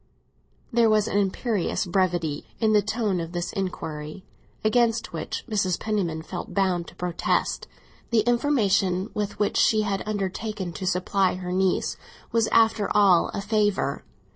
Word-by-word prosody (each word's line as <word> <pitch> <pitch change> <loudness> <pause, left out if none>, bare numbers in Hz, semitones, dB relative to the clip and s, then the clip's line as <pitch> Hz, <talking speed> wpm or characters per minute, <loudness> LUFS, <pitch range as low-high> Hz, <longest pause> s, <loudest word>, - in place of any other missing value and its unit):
There 230 -1 +4
was 215 -1 +3
an 205 - +1
imperious 205 0 -1
brevity 175 -5 0
in 220 -2 +3
the 210 - +5
tone 210 -2 -1
of 165 +1 -5
this 175 0 -3
inquiry, 160 -3 -5 0.4
against 230 0 +2
which - - -4
Mrs. 195 -6 0
Penniman 180 -7 -2
felt 175 +1 -7
bound 185 -3 +1
to - - -13
protest; 175 -1 -1 0.4
the 230 -2 +3
information 215 -6 +1
with 205 -1 -3
which 205 - 0
she 215 -2 +4
had 200 -2 -1
undertaken 205 -2 -3
to 185 +4 -4
supply 185 +1 +1
her 180 -1 -5
niece 185 0 +1 0.3
was, 230 -1 +2
after 225 -2 +3
all, 195 -4 +5
a 200 - -2
favour. 205 -9 0
195 Hz, 145 wpm, -25 LUFS, 180-215 Hz, 0.4 s, the